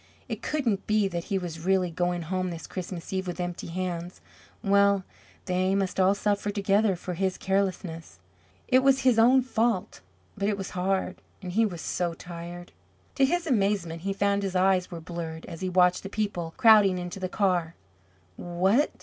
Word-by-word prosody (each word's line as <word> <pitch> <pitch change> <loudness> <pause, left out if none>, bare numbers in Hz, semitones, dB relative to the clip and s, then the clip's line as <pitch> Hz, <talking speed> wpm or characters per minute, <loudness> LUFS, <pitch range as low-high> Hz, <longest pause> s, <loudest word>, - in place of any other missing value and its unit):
It - - -5
couldn't 245 -10 -1
be 215 -2 +3
that 170 -2 -4
he 200 - -1
was 175 -3 -5
really 185 -1 +2
going 175 +1 -1
home 185 +2 -2
this 165 -2 -7
Christmas 180 -1 -6
Eve 190 0 -2
with 175 0 -5
empty 175 -1 -4
hands. 175 0 -4 0.4
Well, 200 0 +4 0.4
they 185 +1 +1
must 195 -1 -1
all 190 +1 +4
suffer 205 0 0
together 200 0 +2
for 180 +1 -6
his 190 +1 -1
carelessness. 185 - -2 0.5
It 255 +1 +5
was 270 0 +4
his 250 -3 +4
own 255 +3 +6
fault, 230 -6 -1 0.3
but 200 0 0
it 205 - -1
was 195 - -5
hard. 190 +1 -1 0.2
And 180 - -5
he 220 +4 +3
was 175 -5 -7
so 175 -2 -2
tired! 175 +1 -9 0.4
To 270 - +3
his 345 +5 0
amazement 195 - 0
he 195 +2 -2
found 200 0 +1
his 195 -2 -3
eyes 185 0 +3
were 170 -2 -7
blurred 165 -1 -6
as 165 - -9
he 185 - -1
watched 180 0 +3
the 195 - -7
people 195 -6 -3
crowding 210 -5 +6
into 180 +2 -5
the 185 -1 -3
car. 180 -5 0 0.6
What? 190 +10 +2
190 Hz, 180 wpm, -27 LUFS, 175-200 Hz, 0.6 s, own